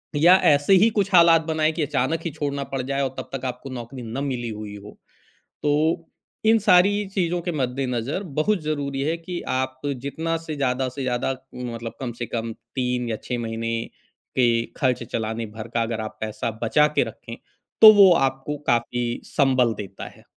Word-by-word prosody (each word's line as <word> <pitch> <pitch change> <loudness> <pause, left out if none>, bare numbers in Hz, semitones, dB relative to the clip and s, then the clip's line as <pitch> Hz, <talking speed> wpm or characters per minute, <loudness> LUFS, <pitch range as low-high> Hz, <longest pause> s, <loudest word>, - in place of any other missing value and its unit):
या 170 +5 +7 0.2
ऐसे 145 +6 +3
ही 195 +4 +6
कुछ 205 -3 -1
हालात 170 -2 +7
बनाएँ 155 -1 +1
कि 165 - -3
अचानक 145 +2 0
ही 170 - -2
छोड़ना 140 -2 -3
पड़ 135 -1 -1
जाए 135 +2 -2
और 135 - 0
तब - - -6
तक 135 -1 -5
आपको 125 +1 -5
नौकरी 125 0 -7
न 120 +5 -4
मिली 125 -4 -3
हुई 105 -1 -7
हो। 105 - -12 0.7
तो 145 - +2 0.8
इन 225 - +5
सारी 200 +1 +4
चीज़ों 175 -2 0
के 175 0 -3
मद्देनज़र 130 - -2 0.2
बहुत 205 +5 +2
ज़रूरी 140 -3 -2
है 165 - -1
कि 175 +1 -6 0.2
आप 130 0 -3 0.2
जितना 165 +4 -2
से 155 - -4
ज़्यादा 130 -1 0
से 130 +2 -6
ज़्यादा 125 0 -1 0.2
मतलब 115 -2 -6
कम 125 -3 -3
से 120 - -2
कम 115 -1 -2 0.2
3 125 -1 -1
या 110 - -1
6 125 - -3
महीने 115 0 -3 0.6
के 125 - +5 0.3
ख़र्च 130 -4 +1
चलाने 110 +1 -2
भर 110 +1 -6
का 115 - +2
अगर 115 -1 -2
आप 110 - -6
पैसा 110 +1 -3
बचा 150 +6 +4
के - - +4
रखें। 115 +1 -10 0.4
तो 220 -1 +12
वो 195 -3 +8
आपको 135 +1 -1
काफ़ी 120 +1 +1 0.2
संबल 130 -5 +2
देता 100 -2 -8
है। - - -20
135 Hz, 185 wpm, -23 LUFS, 120-160 Hz, 0.8 s, तो